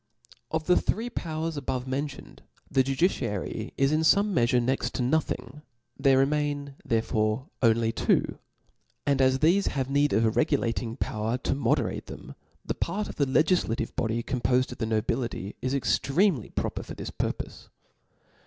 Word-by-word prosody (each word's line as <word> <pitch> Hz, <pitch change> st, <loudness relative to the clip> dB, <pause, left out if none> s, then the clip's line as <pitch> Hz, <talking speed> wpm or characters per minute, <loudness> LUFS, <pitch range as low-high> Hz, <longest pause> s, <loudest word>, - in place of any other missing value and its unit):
Of 160 Hz, 0 st, -2 dB
the 180 Hz, -, +4 dB
three 235 Hz, +3 st, -1 dB
powers 160 Hz, -5 st, -3 dB
above 130 Hz, -2 st, -3 dB
mentioned, 140 Hz, +2 st, -5 dB, 0.3 s
the 135 Hz, -, +4 dB
judiciary 130 Hz, -, -1 dB
is 135 Hz, +1 st, +3 dB
in 155 Hz, -, +2 dB
Ibme 200 Hz, +6 st, +4 dB
meafure 120 Hz, -3 st, +3 dB
next 130 Hz, +2 st, -1 dB
to 125 Hz, -, 0 dB
nothing: 150 Hz, +2 st, -1 dB, 0.3 s
there 135 Hz, -1 st, +4 dB
remain 145 Hz, 0 st, 0 dB
therefore 110 Hz, +2 st, 0 dB
only 115 Hz, -1 st, +3 dB
two; 115 Hz, -, +1 dB, 0.7 s
and 140 Hz, -1 st, +2 dB
as 130 Hz, 0 st, +4 dB
thefe 170 Hz, +8 st, +3 dB
have 135 Hz, -1 st, -2 dB
need 145 Hz, +1 st, +3 dB
of 110 Hz, +3 st, +3 dB
a 110 Hz, -, +3 dB
regulating 115 Hz, 0 st, 0 dB
power 110 Hz, +1 st, -1 dB
to -, -, -1 dB
moderatt 140 Hz, -, 0 dB
them, -, -, -9 dB, 0.3 s
the -, -, -1 dB
part 210 Hz, +1 st, -2 dB
of -, -, -8 dB
the 140 Hz, -, +3 dB
legiflative 130 Hz, -6 st, +1 dB
body 115 Hz, +1 st, -1 dB
colfnpofed 130 Hz, 0 st, +1 dB
of 125 Hz, -, -9 dB
the 110 Hz, -, -1 dB
nobility, 110 Hz, -2 st, -2 dB
is 130 Hz, +2 st, -1 dB
extremely 140 Hz, -, +1 dB
proper -, -, -3 dB
for -, -, -8 dB
this -, -, -6 dB
pur -, -, -1 dB
pofe. -, -, -9 dB
135 Hz, 160 wpm, -27 LUFS, 120-150 Hz, 0.7 s, the